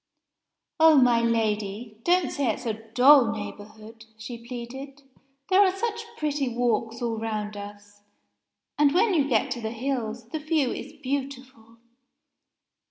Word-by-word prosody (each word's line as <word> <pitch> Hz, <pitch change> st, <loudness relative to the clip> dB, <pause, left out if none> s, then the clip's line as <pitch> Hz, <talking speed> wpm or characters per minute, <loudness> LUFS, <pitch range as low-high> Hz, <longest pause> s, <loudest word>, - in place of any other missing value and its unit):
"Oh, 320 Hz, -1 st, +7 dB
my 245 Hz, -3 st, +5 dB
Lady! 215 Hz, -1 st, -1 dB
don't 355 Hz, -2 st, +2 dB
say 280 Hz, -3 st, -1 dB
it's -, -, -2 dB
a 225 Hz, -, 0 dB
dull 235 Hz, +3 st, +5 dB
neighborhood," 220 Hz, +1 st, -9 dB
she 230 Hz, +1 st, -8 dB
pleaded. 265 Hz, +3 st, -8 dB, 0.5 s
"There 380 Hz, +1 st, +5 dB
are 385 Hz, -2 st, +5 dB
such 455 Hz, +2 st, -3 dB
pretty 290 Hz, -3 st, -1 dB
walks 235 Hz, -1 st, -1 dB
all 230 Hz, -2 st, -2 dB
round 215 Hz, -2 st, -4 dB
us. 205 Hz, 0 st, -11 dB, 0.8 s
And, 295 Hz, +1 st, +4 dB
when 400 Hz, +3 st, +3 dB
you 290 Hz, -5 st, +2 dB
get 225 Hz, -4 st, +1 dB
to 240 Hz, -, -3 dB
the 220 Hz, -, -3 dB
hills, 235 Hz, -1 st, -4 dB
the 315 Hz, -, -4 dB
view 305 Hz, -4 st, 0 dB
is -, -, -7 dB
beautiful." 260 Hz, -4 st, -5 dB
240 Hz, 140 wpm, -26 LUFS, 220-280 Hz, 0.8 s, Oh